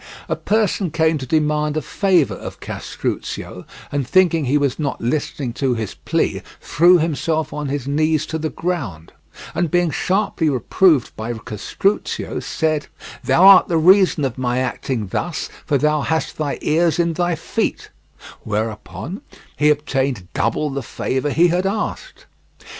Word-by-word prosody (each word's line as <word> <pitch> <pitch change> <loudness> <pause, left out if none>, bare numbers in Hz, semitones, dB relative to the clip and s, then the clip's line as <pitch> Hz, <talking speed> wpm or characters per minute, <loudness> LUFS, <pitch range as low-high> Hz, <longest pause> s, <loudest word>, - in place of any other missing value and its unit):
A - - 0
person 210 -3 0
came 160 0 +1
to 130 - -6
demand 150 0 +1
a - - 0
favour 185 -7 +2
of - - -8
Castruccio, - - -5 0.2
and 140 -3 -1
thinking 170 -1 +3
he 135 +3 +2
was 140 -1 0
not 145 -2 -2
listening 125 0 -2
to 130 -1 0
his 110 -3 -4
plea - - -1 0.2
threw 175 +3 +4
himself 160 0 -1
on 150 -1 -3
his 140 -2 -3
knees 155 +1 +1
to 160 - -4
the 155 0 -2
ground, 130 - -4 0.4
and 175 -2 0
being 175 -1 +2
sharply 185 -4 0
reproved 140 - +2
by 110 +2 -4
Castruccio, 110 - -2
said: 155 -2 -1 0.4
"Thou 175 - +3
art 195 -1 +9
the 170 - +1
reason 180 -2 +5
of 130 -2 -4
my 125 -1 0
acting 130 -2 -2
thus 165 - -3 0.2
for 145 - +3
thou 150 +1 +1
hast 160 +2 -1
thy 145 -2 -1
ears 165 0 +2
in 170 -1 +1
thy 175 +1 0
feet," - - -3 0.5
whereupon 110 - -4 0.3
he 150 +1 +3
obtained 135 -8 0
double 150 -1 0
the 140 0 -3
favour 130 +4 -2
he 170 +4 +4
had 180 +3 +1
asked. 215 - -4
150 Hz, 155 wpm, -20 LUFS, 135-170 Hz, 0.5 s, art